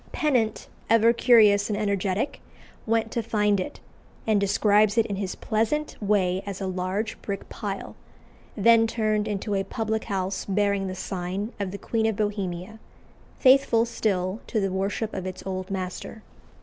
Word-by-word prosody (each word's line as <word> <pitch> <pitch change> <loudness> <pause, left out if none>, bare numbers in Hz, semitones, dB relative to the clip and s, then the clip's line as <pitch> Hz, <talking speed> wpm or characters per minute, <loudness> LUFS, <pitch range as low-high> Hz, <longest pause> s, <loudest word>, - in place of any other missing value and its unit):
Pennant, 245 -8 0 0.2
ever 230 +1 +5
curious 215 -4 +5
and 205 - -1
energetic, 200 +3 -1 0.5
went 225 0 +1
to 235 - -1
find 210 -2 +1
it, 185 - -5 0.5
and 215 -2 +2
describes 205 +2 +3
it 230 - +4
in 200 - -3
his 195 -1 -3
pleasant 235 +8 -1
way 190 -3 +1
as 200 -2 -6
a 195 - -3
"large 185 +3 -3
brick 200 -1 -5
pile," 200 -3 -5 0.6
then 225 +2 +5
turned 215 -2 0
into 205 0 -2
a 195 -1 +1
public 220 0 -2
house 190 -2 -2
bearing 200 -1 +1
the 185 - -4
sign 190 +4 -4
of 200 -2 -2
the 200 - -6
Queen 225 +1 0
of 220 - 0
Bohemia, 200 -1 -3 0.6
faithful 260 -4 +5
still 195 -3 -1
to 220 - 0
the 195 -2 0
worship 200 +3 -2
of 185 -1 -4
its 185 - -7
old 185 -1 -4
master. 190 +3 -5
205 Hz, 160 wpm, -25 LUFS, 195-220 Hz, 0.6 s, ever